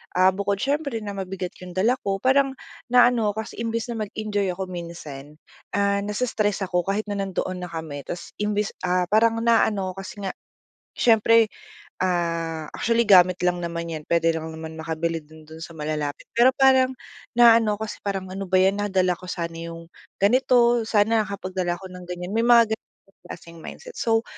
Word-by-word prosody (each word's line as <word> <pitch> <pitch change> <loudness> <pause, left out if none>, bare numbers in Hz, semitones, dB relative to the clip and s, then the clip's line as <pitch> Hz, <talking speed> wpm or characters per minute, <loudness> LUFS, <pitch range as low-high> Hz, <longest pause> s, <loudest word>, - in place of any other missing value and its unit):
ah, 185 +1 +5
bukod 200 +1 -1
siyempre 280 -2 -1
na 205 - -4
mabigat 185 -1 -4
'yung 180 -1 -9
dala 230 +7 +2
ko 195 -1 -1
parang 270 +1 +3 0.3
naano 245 -3 +4
ako 220 - -2
kasi - - -11
imbes 230 +1 -2
na 230 - -4
mag-enjoy 205 -2 -2
ako 190 +1 -4
minsan, 150 -5 -8 0.4
ah, 200 0 +2
nasa-stress 210 -1 -1
ako, 180 -1 0
ah, 195 - +1
kahit 215 - -2
na 200 - -2
nandoon 185 -1 -3
na - - -9
kami. 160 -4 -6
Tapos 175 0 -6
imbes 210 0 0 0.2
ah, 180 0 +2
parang 225 +1 +3
naano 215 -5 +2
ako 195 - -10
kasi 205 0 -9
nga 190 - -1 0.6
siyempre, 230 -1 +4 0.5
ah, 165 -3 -1
actually 235 0 +1
gamit 185 -3 +6
lang 180 0 +1
naman 170 -1 -4
'yan 155 -1 -6
puwede 165 -1 +3
lang 160 0 -5
naman 160 0 -7
makabili 165 +1 -2
din 155 +1 -16
do'n 160 +1 -12
sa 165 0 -9
malalapit, 150 -1 -3
pero 240 +2 +5
parang, 260 -1 +4 0.4
naano 230 -3 +6
kasi 220 0 -6
parang, 195 -2 -3
"Ano 195 -1 -5
ba 185 - +2
'yan, 195 +2 +2
nadala 190 -3 +1
ako 185 - -12
sana 170 -1 -3
'yung 165 0 -8 0.4
ganito, 240 +2 +4
sana 220 +1 +3
nakapagdala 185 -3 -3
ako 190 0 -11
ng 180 -1 -9
ganiyan." 180 +2 -5
May 225 - +1
mga 235 -2 +6
gano'ng 195 -3 -10
klaseng 170 0 -10
mindset. - - -10
So, 225 0 +2
195 Hz, 180 wpm, -24 LUFS, 170-225 Hz, 0.6 s, gamit